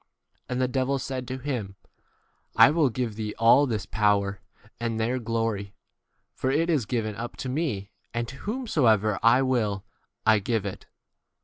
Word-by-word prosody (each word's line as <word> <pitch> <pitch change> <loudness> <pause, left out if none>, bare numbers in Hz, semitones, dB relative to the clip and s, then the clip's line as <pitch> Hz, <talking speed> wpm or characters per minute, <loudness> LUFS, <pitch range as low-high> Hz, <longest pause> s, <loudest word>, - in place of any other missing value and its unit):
And 125 0 -2
the 130 - +2
devil 130 +1 0
said 130 -1 -4
to 130 - -4
him, 125 -8 -4 0.8
I - - +8
will 155 -3 +3
give 120 -1 -2
thee 105 -1 -4
all 115 +5 +6
this 110 -5 -2
power, 100 -2 +1 0.4
and 115 -1 -2
their 120 +3 0
glory; 115 -4 -2 0.6
for 130 - -2
it 165 +5 +2
is 135 -9 +1
given 110 -3 -2
up 120 +3 -6
to 130 - -4
me, 125 -9 -2 0.2
and 120 0 -2
to 135 - -9
whomsoever 130 - +1
I 125 +3 +5
will 110 -7 0 0.4
I 110 -1 +5
give 110 0 -1
it. 100 - -6
120 Hz, 165 wpm, -26 LUFS, 105-130 Hz, 0.8 s, I